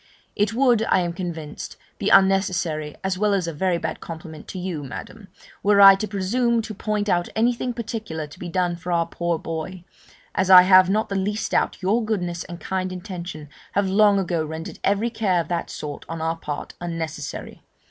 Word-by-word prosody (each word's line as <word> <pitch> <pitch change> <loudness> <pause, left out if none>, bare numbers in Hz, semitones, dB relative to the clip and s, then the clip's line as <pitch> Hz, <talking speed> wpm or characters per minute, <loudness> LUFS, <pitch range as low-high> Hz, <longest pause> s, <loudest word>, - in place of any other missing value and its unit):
It 210 +1 0
would, 245 -3 +4
I 190 - +4
am 175 -1 -2
convinced, 170 -4 -6 0.2
be - - 0
unnecessary, 180 -6 +2
as 190 -1 -1
well 210 -1 +3
as 185 -3 0
a 165 - -3
very 175 +3 0
bad - - -4
compliment 160 -2 -9
to - - -7
you, 180 -5 -4
Madam, 200 - -9 0.3
were 205 0 +4
I 195 0 +11
to 195 +2 -2
presume 225 +4 0
to 215 - -6
point 210 0 -2
out 175 -3 +1
anything 240 +2 +1
particular 220 -9 -5
to 145 - -14
be 175 - -6
done 180 -1 0
for 175 +1 -6
our 170 -1 +2
poor 170 0 -2
boy, 165 +3 -6 0.5
as 190 0 0
I 180 -1 +10
have 185 0 +6
not 215 +3 +1
the 195 - -2
least 205 +3 -1
doubt - - 0
your 215 +5 +2
goodness 180 -6 -2
and 175 -1 -8
kind 185 -1 -2
intention 175 -4 -7 0.3
have 200 -1 +1
long 205 +1 +5
ago 175 -4 0
rendered 160 +1 -7
every 205 +4 +1
care 200 -6 +1
of 170 - -3
that 170 -1 -2
sort 145 -1 -6
on 165 0 -4
our 165 +1 -1
part 150 -3 -6
unnecessary. 165 -3 -5
185 Hz, 195 wpm, -23 LUFS, 170-205 Hz, 0.5 s, I